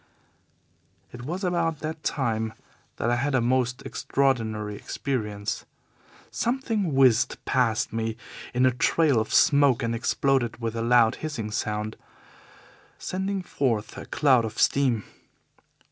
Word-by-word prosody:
"It 120 0 -9
was 180 +7 -4
about 170 -3 0
that 155 0 -5
time 110 -5 -1 0.4
that 120 - -1
I 120 - +2
had 135 +2 0
a - - +4
most 125 +2 0
extraordinary 115 -4 -1
experience. 105 -5 -3 0.7
Something 225 - -1
whizzed 130 -4 +4
past 115 -5 +1
me 115 0 -2 0.3
in 125 +1 +2
a 130 - +5
trail 140 +1 +2
of 110 - -3
smoke 140 -4 +4
and 115 0 0
exploded 120 0 0
with 115 -1 -3
a 115 - -2
loud, 115 -1 +4
hissing 120 -9 -4
sound, 105 0 -3 1.0
sending 190 +1 -3
forth 115 -10 -1
a - - -8
cloud 130 -5 +3
of 110 0 -5
steam. 130 -6 +2
125 Hz, 130 wpm, -26 LUFS, 115-140 Hz, 1.0 s, a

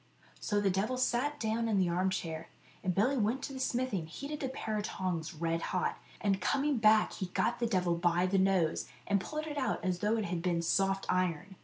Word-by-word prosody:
So 205 -1 0
the 200 -2 +2
devil 210 +7 0
sat 255 +4 0
down 225 +1 0
in 210 - +2
the 185 -2 +3
arm 180 +2 +1
chair, 165 -3 -4 0.3
and 180 -1 0
Billy 250 +8 +3
went 230 +4 0
to 275 - -4
the 265 - -6
smithy 255 -5 0
and 160 -1 -8
heated 285 - -6
a 265 - -1
pair 220 -4 -3
of 210 - -1
tongs 175 -4 -3
red 165 +1 -1
hot, 180 - -1 0.2
and 195 -2 +1
coming 285 0 +1
back, 215 -1 +5
he 190 - -4
got 185 +1 0
the 235 - +1
devil 180 -5 +1
by 175 +1 +2
the 190 +1 +2
nose, 185 -4 +2 0.2
and 200 -1 +2
pulled 305 +6 -4
it 295 -2 -3
out 260 - -1
as 180 -1 0
though 210 +4 +1
it 215 - -1
had 170 -2 -2
been 170 -1 0
soft 195 +3 +1
iron. 185 +1 0
195 Hz, 225 wpm, -32 LUFS, 180-235 Hz, 0.3 s, back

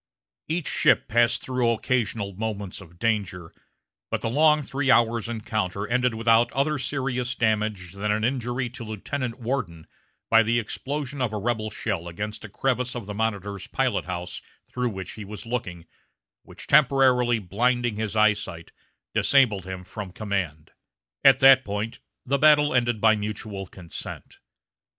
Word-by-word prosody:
Each 160 0 -2
ship - - +3
passed 120 +1 +2
through 125 -2 0
occasional 115 -3 -1
moments 100 -2 -4
of 85 -2 -15
danger, 95 -5 -2 0.6
but - - -2
the 115 - -2
long 150 +2 +4
three 135 0 -2
hours' 115 -1 +3
encounter 105 -4 -2
ended 125 -1 +1
without 115 +1 +3
other 140 +3 +1
serious 125 -2 -2
damage 105 -5 0
than 100 +2 -3
an 105 +1 0
injury 125 0 -1
to 125 -1 -8
Lieutenant 115 +3 -4
Worden 115 -10 -3 0.4
by 115 0 +6
the 115 +1 +1
explosion 140 +4 -4
of 120 -4 0
a 105 - -3
rebel 110 0 -1
shell 100 -5 -3
against 105 +6 -6
a 105 - -8
crevice 125 +3 -1
of 120 -4 -5
the 105 - -6
Monitor's 100 -2 -3
pilot - - 0
house 90 0 -5 0.3
through 125 -1 -1
which 95 -4 -6
he 110 - -8
was 105 +2 -8
looking, 95 -8 -4 0.6
which, - - -11
temporarily 130 -4 +4
blinding 115 +3 0
his 110 -1 -3
eye 110 0 +5
sight, 85 -5 -8 0.4
disabled 110 -9 +3
him 95 -1 -6
from 100 +1 -7
command. 95 -7 -3 0.5
At 135 -1 +6
that 135 0 +8
point 105 +2 -4 0.3
the 140 +2 +1
battle 150 -1 +5
ended 120 -3 +1
by 110 -1 +5
mutual 105 -2 -5
consent. 90 -2 -9
115 Hz, 155 wpm, -25 LUFS, 100-125 Hz, 0.6 s, that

